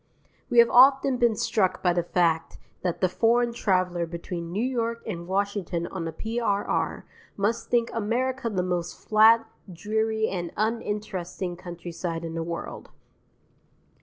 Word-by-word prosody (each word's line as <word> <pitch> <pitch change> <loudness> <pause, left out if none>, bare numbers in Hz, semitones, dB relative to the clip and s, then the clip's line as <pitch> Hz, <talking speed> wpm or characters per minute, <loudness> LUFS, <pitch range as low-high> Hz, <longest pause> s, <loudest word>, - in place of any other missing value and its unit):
We 240 - 0
have 235 0 +8
often 270 +1 +6
been 235 -3 +3
struck 195 -3 0
by 180 -2 +3
the 175 - +1
fact 170 -2 0 0.2
that 180 -2 -2
the 185 - +4
foreign 235 +5 +2
traveller 185 -6 0
between 170 0 -6
New 210 +7 -1
York 235 -2 -2
and 170 -5 -5
Washington 190 -3 -1
on 175 -1 -5
the 165 - -3
P.R.R. 220 0 -1 0.3
must 220 +4 -1
think 235 -1 +1
America 240 +3 -1
the 185 -4 -1
most 175 -1 -2
flat, 225 +1 +5 0.3
dreary, 220 +4 -1
and 175 -3 -4
uninteresting 205 -5 -3
countryside 170 -1 -6
in 165 - -5
the 165 - -3
world. 170 +1 -6
200 Hz, 140 wpm, -26 LUFS, 175-230 Hz, 0.3 s, have